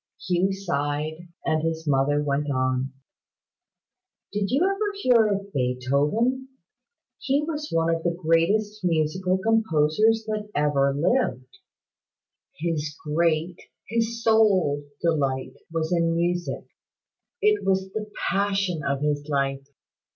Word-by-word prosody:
Hugh 180 +2 +2
sighed, 155 -2 -3 0.2
and 155 0 +1
his 160 0 -2
mother 145 +1 +2
went 145 0 -1
on: 130 0 0 1.4
"Did 205 -1 -1
you 275 - +2
ever 400 +1 0
hear 240 - +4
of 200 -1 -3
Beethoven? 140 - 0 0.7
He 280 +2 +1
was 300 -1 -4
one 165 0 +2
of 165 - -2
the 175 - +1
greatest 185 +6 +1
musical 180 +2 +1
composers 220 +1 +2
that 215 -1 -3
ever 145 -2 +2
lived. 240 - 0 1.0
His 155 -3 -2
great, 165 +2 0 0.3
his 230 0 -1
sole 195 -10 +3 0.2
delight 135 -6 0 0.2
was 165 0 -2
in 165 -1 +2
music. 175 +1 -1 0.7
It 425 -1 +2
was 190 0 0
the 215 -1 -4 0.2
passion 195 -4 0
of 140 0 -1
his 145 0 -1
life. 135 -1 -1
170 Hz, 115 wpm, -25 LUFS, 145-210 Hz, 1.4 s, hear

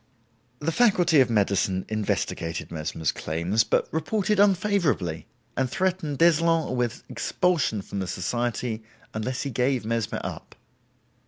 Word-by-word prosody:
The 150 +5 -1
Faculty 180 -6 +4
of 130 -2 +5
Medicine 100 -3 +1
investigated 100 -6 -2
Mesmer's 80 -1 -2
claims, 85 +8 0
but - - +1
reported 200 +6 0
unfavorably, 175 - +2 0.3
and 130 -1 0
threatened 180 -3 -1
d'Eslon 165 -2 +3
with 120 -2 -2
expulsion 160 - 0
from 100 - -5
the 95 - -2
society 120 +4 -2 0.3
unless 120 +4 -2
he 140 - -3
gave 125 0 0
Mesmer 115 -1 -1
up. - - -7
125 Hz, 120 wpm, -26 LUFS, 100-165 Hz, 0.3 s, of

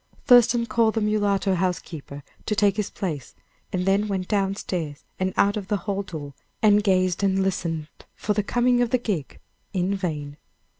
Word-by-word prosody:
Thurston 240 -1 +6
called 230 0 +2
the 225 - +1
mulatto 205 -2 +1
housekeeper 170 -6 -3 0.2
to 210 - +1
take 200 -2 +3
his 210 -1 -1
place, 160 - -5 0.4
and 180 -1 -1
then 200 +2 +2
went 190 -3 -2
down 195 -2 +1
stairs 160 -8 -4 0.2
and 185 0 0
out 200 0 +4
of 200 -3 -5
the 205 0 +1
hall 200 -1 -1
door, 155 -7 -7 0.3
and 210 -1 +5
gazed 185 -3 +2
and 195 -1 +2
listened 165 -5 -2 0.3
for 210 - -1
the 210 - +1
coming 245 +3 +2
of 240 - +2
the 255 - +3
gig, 200 - -4 0.3
in 185 +1 0
vain. 150 -7 -3
195 Hz, 180 wpm, -24 LUFS, 180-210 Hz, 0.4 s, Thurston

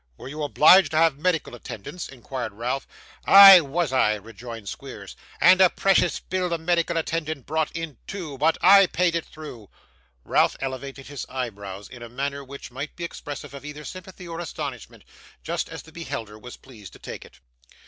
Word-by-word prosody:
'Were - - -10
you 155 +2 -7
obliged 155 +4 +6
to - - +1
have 160 -3 +3
medical 165 -3 -1
attendance?' 120 - -8
inquired 125 -3 -6
Ralph. 120 +5 -3 0.4
'Ay, 195 -2 +11
was 150 0 -2
I,' 110 -5 +3
rejoined 115 +1 -10
Squeers, - - -9 0.2
'and 185 +1 +6
a 185 - +7
precious 195 +1 +2
bill 185 -1 -2
the 170 - -1
medical 170 0 0
attendant 160 -4 -3
brought 160 +1 -1
in 165 -5 -6
too; 170 -8 -6
but 160 +3 +2
I 195 +1 +8
paid 175 0 +1
it 170 -1 -2
though.' 125 -10 -10 0.5
Ralph - - +2
elevated 135 +1 -6
his 145 -2 -7
eyebrows 100 -6 -6
in 125 - -12
a 120 - -8
manner 140 +3 -4
which 140 -1 -10
might 140 +4 -6
be 175 - -7
expressive 145 -4 -7
of 140 - -9
either 150 0 -9
sympathy 185 -1 -10
or 165 0 -6
astonishment 145 - -7 0.4
just - - -3
as - - -8
the 160 - -16
beholder 130 -10 -7
was 125 +2 -11
pleased 110 -8 -14
to - - -13
take - - -9
it. 60 - -18
145 Hz, 180 wpm, -24 LUFS, 125-170 Hz, 0.5 s, Ay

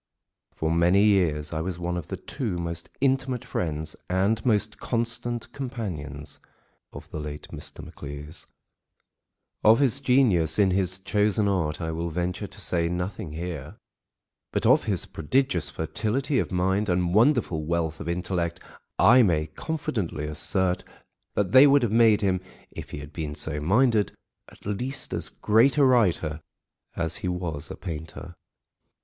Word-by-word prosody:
For 80 0 -2
many 85 +4 +4
years 85 -9 +2
I 80 - -1
was 90 0 -3
one 90 0 -2
of 85 -3 -5
the - - -5
two 110 -10 -4
most 85 -1 -4
intimate 130 -2 +1
friends 80 -2 -3
and 100 +4 +1
most 110 -2 +1
constant 120 0 -2
companions 80 - -6 0.5
of - - -10
the - - -4
late 75 0 -7
Mr. - - -7
Maclise. 75 +4 -9 1.2
Of 110 +2 +7
his 135 -1 +2
genius 120 - +3
in 100 -3 +4
his 90 -1 0
chosen 105 +1 +1
art 85 -6 0
I 80 -1 -2
will 85 +1 -3
venture 90 +4 -2
to 105 - -13
say 85 -3 0
nothing 90 -1 -4
here, 85 0 -6 0.8
but - - -1
of - - +5
his - - 0
prodigious 95 - 0
fertility 115 - -1
of - - -2
mind 95 +3 +1
and 90 -1 +1
wonderful 110 - +3
wealth 80 0 -1
of 85 - -5
intellect, 85 -1 -2 0.4
I 125 +3 +7
may 80 -8 +2
confidently 95 - -3
assert 90 +4 0 0.5
that 100 -3 0
they 130 +4 +9
would 140 -1 +5
have 115 - +1
made 110 -1 +5
him, 95 -2 +1 0.3
if - - -8
he - - -6
had 70 0 -9
been 75 -3 -4
so 75 0 -2
minded, 105 - +2 0.4
at - - -19
least 125 +7 -2
as - - -3
great 115 +7 +3
a 145 - +6
writer 90 -11 +2 0.5
as 85 0 -1
he - - -4
was 85 -4 -3
a - - -6
painter. 85 0 -7
90 Hz, 155 wpm, -26 LUFS, 80-110 Hz, 1.2 s, they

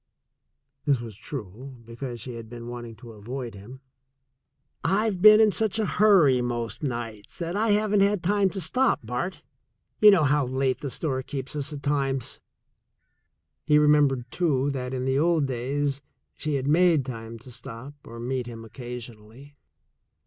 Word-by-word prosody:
(This 140 -4 +3
was 115 -3 -8
true, 125 - -8
because 120 +1 -7
she 125 +3 -7
had 115 -1 -9
been 120 0 -8
wanting 120 -1 -7
to 115 +1 -12
avoid 120 +3 -6
him.) 110 +7 -12 1.0
"I've 195 +1 +1
been 215 +1 +9
in 220 -1 +5
such 220 0 0
a 220 - +1
hurry, 175 -15 +4
most 120 -2 -3
nights, 120 -6 -5
that 170 +1 -3
I 220 +2 +1
haven't 210 0 +2
had 200 -1 +2
time 200 +1 +2
to 195 - -5
stop, 255 +11 +1
Bart. 125 +11 -4 0.6
You 210 - +9
know 190 -6 +5
how 145 -1 +2
late 130 0 0
the 140 - -4
store 130 -1 -2
keeps 135 +1 -6
us 145 0 -2
at 145 -2 -7
times." 135 -3 -1 1.3
He 150 -1 +5
remembered, 145 -4 +4
too, 145 -6 +1
that 130 -1 -4
in 130 0 -2
the 130 +1 +1
old 165 -2 +3
days 135 +2 -2 0.3
she 155 -2 -2
had 135 -1 -1
made 165 -2 +4
time 115 -2 -7
to 125 +3 -13
stop 120 +3 -9
or 115 0 -10
meet 125 +1 -3
him 115 -1 -8
occasionally. 120 +2 -10
135 Hz, 165 wpm, -26 LUFS, 120-160 Hz, 1.3 s, been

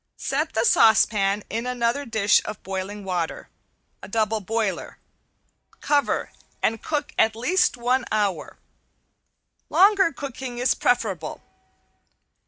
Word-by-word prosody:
Set 300 +4 -2
the 220 +1 +1
saucepan 210 -3 +4
into 230 +3 -3
another 245 +3 -1
dish 220 -3 +3
of 210 - -7
boiling 195 +2 -5
water 180 -4 -3 0.6
(double 220 +1 0
boiler), 215 -2 -3 0.8
cover 290 -1 0 0.3
and 225 0 0
cook 295 -1 -3
at 220 0 +3
least 355 +8 +1
one 250 +2 +1
hour. 200 -7 -1 1.1
Longer 390 -2 +4
cooking 265 -4 -7
is 250 +1 +2
preferable. 195 -10 -1
225 Hz, 105 wpm, -24 LUFS, 205-260 Hz, 1.1 s, saucepan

